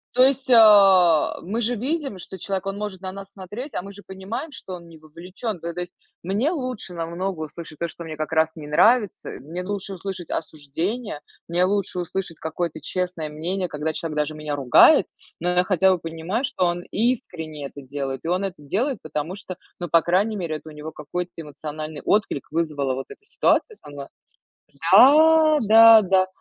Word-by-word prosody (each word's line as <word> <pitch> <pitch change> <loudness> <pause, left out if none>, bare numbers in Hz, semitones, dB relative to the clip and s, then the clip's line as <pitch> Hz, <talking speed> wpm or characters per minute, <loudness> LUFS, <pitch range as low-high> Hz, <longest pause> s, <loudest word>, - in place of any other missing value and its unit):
то 255 - +6
есть, 270 0 +2
а, 195 -7 +6
мы 210 +7 -3
же 240 +2 0
видим, 270 - -3
что 190 +2 -9
человек, 195 +2 -3
он 195 0 -3
может 205 -3 -5
на 185 -1 -5
нас 195 0 -10
смотреть, 210 +9 -8
а - - -1
мы 200 +1 -10
же 205 - -14
понимаем, 190 +11 -6
что 190 -8 -9
он 170 -1 -12
не 165 - -14
вовлечён. 180 +6 -7
То 170 +1 -5
то 175 - -6
есть, 175 0 -7 0.3
мне 205 - 0
лучше 255 - -5
намного 170 +2 -4
услышать 155 0 -9
то, 170 - -1
что 170 - -10
мне 160 -1 -7
как 155 +1 -4
раз 160 0 +2
не 155 -2 -9
нравится. 210 +7 +2
Э, - - -9
мне 165 +7 -6
лучше 200 0 -5
услышать 185 -2 -7
осуждение. 160 - -4 0.3
Мне 175 +2 +2
лучше 195 -2 -1
услышать 175 -1 -4
какое-то 160 0 -4
честное 180 -2 -3
мнение, 180 +5 -2
когда 150 +1 -2
человек 155 -2 -5
даже 150 +1 -1
меня 150 -1 -4
ругает, 135 -3 +6 0.3
но 175 - -1
я 180 0 +3
хотя 190 0 +3
бы 185 - +2
понимаю, 165 +8 -4
что 185 -8 0
он 175 0 -1
искренне 175 - -2
это 140 - -12
делает. 135 -1 -5
И - - -5
он 180 +3 0
это 190 -2 -4
делает, 220 - -1
потому 155 +2 -4
что, 190 -2 -8 0.2
ну, 175 - -5
по 165 - +5
крайней 195 +5 +1
мере, 165 -4 -3
это 155 - -13
у 155 - -12
него 150 +1 -8
какой-то 175 +4 -5
эмоциональный 155 0 -7
отклик 205 -9 0
вызвала 150 -5 -1
вот 135 +1 -6
эта 415 - -14
ситуация 440 +1 +1
со - - -14
мной. 140 -1 -8 0.9
Да, 310 +6 +7
да, 225 +1 +8
да. 190 -1 +3
180 Hz, 195 wpm, -23 LUFS, 160-205 Hz, 0.9 s, да